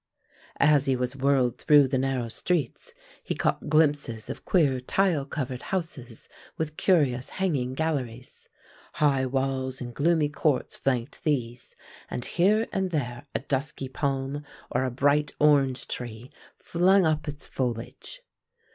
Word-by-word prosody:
As 145 -2 +4
he 135 - +3
was 125 +1 -2
whirled 135 -3 +2
through 145 -3 +6
the 130 0 0
narrow 130 -2 -1
streets 175 - -2 0.3
he - - -3
caught - - -1
glimpses 145 -7 +1
of - - -9
queer 145 -8 +3
tile 160 +2 +1
covered 130 -3 -4
houses 145 - -5 0.3
with 155 -1 -3
curious 140 -10 +2
hanging 140 -10 -1
galleries. 130 -6 -3 0.4
High 135 -3 +2
walls 130 0 -1
and 120 -1 -6
gloomy 160 +1 +2
courts 145 -2 0
flanked 130 +3 -2
these, 125 -6 -2 0.3
and 125 - -4
here 210 +6 +2
and 190 -1 0
there 125 -4 -3
a - - 0
dusky 135 -1 -3
palm 135 +1 -2 0.3
or 130 - +1
a - - 0
bright 145 +3 +2
orange 140 -3 +3
tree 120 0 -6 0.3
flung 185 +2 +3
up 155 -1 0
its 150 -1 -5
foliage. 125 - -4
140 Hz, 140 wpm, -27 LUFS, 125-155 Hz, 0.4 s, through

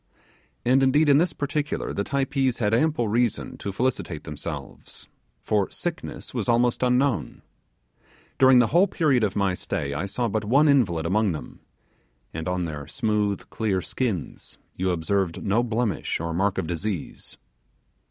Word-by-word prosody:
And 130 +2 +4
indeed 145 +3 +4
in 140 0 +6
this 175 +2 +2
particular 145 0 -2
the 100 - -1
Typees 135 0 0
had 105 -2 0
ample 125 -1 +2
reason 115 +1 0
to 100 - -4
felicitate 100 -7 -2
themselves, 75 -2 -8 0.4
for 105 -3 +1
sickness 175 -1 -5
was 120 -3 -2
almost 120 0 +2
unknown. 125 - +1 1.0
During 130 -1 +7
the 120 -2 +4
whole 180 +4 +5
period 140 - +2
of 100 -3 0
my 100 -2 +1
stay 70 -5 -3
I 75 +7 -2
saw 120 +4 -1
but 110 0 -1
one 135 +9 +4
invalid 100 - +3
among 100 +2 +2
them; 75 - -8 0.7
and 80 0 -5
on 90 -1 -1
their 75 -3 -6
smooth 105 -5 -1 0.4
skins 110 - -4 0.2
you 95 +1 -1
observed 90 +1 -1
no 105 +4 +2
blemish 115 -4 -1
or 85 0 -3
mark 95 +3 0
of - - -1
disease. 85 +2 -5
110 Hz, 150 wpm, -25 LUFS, 90-130 Hz, 1.0 s, During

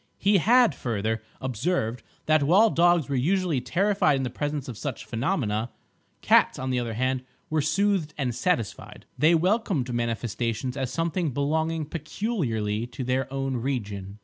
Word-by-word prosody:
He 200 0 +3
had, 240 - +5
further, 110 -3 -2 0.2
observed 125 -2 -1 0.2
that 155 -1 +4
while 195 +10 +5
dogs 175 -2 +3
were 140 - -2
usually 170 +1 +1
terrified 180 +2 +2
in 135 - -1
the 125 - -3
presence 145 +1 -3
of 125 - -6
such 130 +3 -5
phenomena, 115 - -1 0.5
cats - - +4
on 130 0 -3
the 125 - +1
other 115 -2 -3
hand 130 +2 0 0.3
were 155 -1 +2
soothed 165 0 +1
and 130 -4 -1
satisfied. 120 - -2
They 160 +5 +5
welcomed 180 - +1
manifestations 120 +1 -2
as 130 -3 -3
something 165 0 -1
belonging 155 +4 -1
peculiarly 140 - -2
to 130 - -6
their 130 +1 -1
own 135 -1 -2
region. 105 -6 -4
135 Hz, 150 wpm, -26 LUFS, 120-165 Hz, 0.5 s, had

